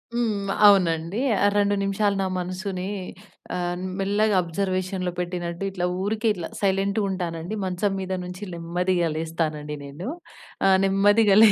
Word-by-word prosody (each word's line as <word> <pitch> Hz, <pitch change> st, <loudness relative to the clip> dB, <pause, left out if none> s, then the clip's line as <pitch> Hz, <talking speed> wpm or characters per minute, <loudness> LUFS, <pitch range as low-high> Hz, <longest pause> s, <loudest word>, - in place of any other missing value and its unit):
హ్మ్. 210 Hz, -4 st, 0 dB, 0.2 s
అవునండి. 175 Hz, -1 st, +3 dB, 0.4 s
2 205 Hz, 0 st, +3 dB
నిమిషాలు 200 Hz, +1 st, +1 dB
నా -, -, 0 dB
మనసుని 185 Hz, +1 st, -4 dB, 0.7 s
ఆహ్, 175 Hz, 0 st, -2 dB, 0.2 s
మెల్లగా 205 Hz, +2 st, +2 dB
ఆబ్‌జర్‌వేషన్‌లో 185 Hz, +1 st, -2 dB
పెట్టినట్టు 175 Hz, 0 st, -3 dB
ఇట్లా 180 Hz, -2 st, -2 dB, 0.2 s
ఊరికే 215 Hz, +3 st, 0 dB
ఇట్లా 175 Hz, -5 st, -5 dB
సైలెంట్‌గుంటానండి. 195 Hz, -3 st, -1 dB
మంచం 185 Hz, +2 st, 0 dB
మీద 190 Hz, 0 st, -3 dB
నుంచి 180 Hz, +2 st, -7 dB
నెమ్మదిగా 175 Hz, +1 st, 0 dB
లేస్తానండి 155 Hz, -2 st, -2 dB
నేను. 145 Hz, +7 st, -7 dB, 0.6 s
ఆహ్, 190 Hz, -1 st, +6 dB
నెమ్మదిగా‌ 200 Hz, +1 st, +4 dB
లే 220 Hz, -, +8 dB
185 Hz, 120 wpm, -24 LUFS, 175-200 Hz, 0.7 s, లే